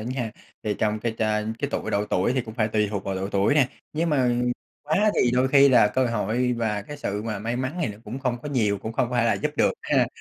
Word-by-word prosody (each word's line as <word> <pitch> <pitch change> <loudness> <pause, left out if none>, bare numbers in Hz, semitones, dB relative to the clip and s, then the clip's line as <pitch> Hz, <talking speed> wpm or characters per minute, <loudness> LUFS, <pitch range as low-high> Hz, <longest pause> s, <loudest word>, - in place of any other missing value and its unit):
nha. 120 0 -3 0.3
Thì 105 -1 -1
trong 110 0 0
cái 115 0 -2
chà 105 -1 +1 0.2
cái 140 0 -2
tuổi - - -3
độ 100 +1 +1
tuổi 105 +2 +1
thì 130 - +1
cũng 110 -3 -8
phải 110 -3 +1
tùy 105 -1 +1
thuộc 100 -2 -3
vào 95 - -2
độ 95 +1 -3
tuổi 100 +8 +2
nè, 140 -4 +4 0.2
nhưng 165 +2 0
mà 130 -4 +3 0.5
quá 185 +9 +2
thì 125 - +3
đôi 125 +2 +2
khi 140 0 +6
là 120 -5 +6
cơ 130 +4 +1
hội 115 +2 0
và 110 -3 -1
cái 145 +8 -8
sự 105 -7 -3
mà 110 -2 -3
may 115 +4 -3
mắn 130 +7 -3
thì - - 0
nó 105 0 -8
cũng 125 - -6
không 125 -3 -1
có 150 - -5
nhiều, 105 -7 +1
cũng 110 +3 -6
không 120 +1 0
phải 120 -2 +2
là - - +3
giúp - - -1
được - - +3
ha. - - +2
115 Hz, 270 wpm, -25 LUFS, 105-130 Hz, 0.5 s, khi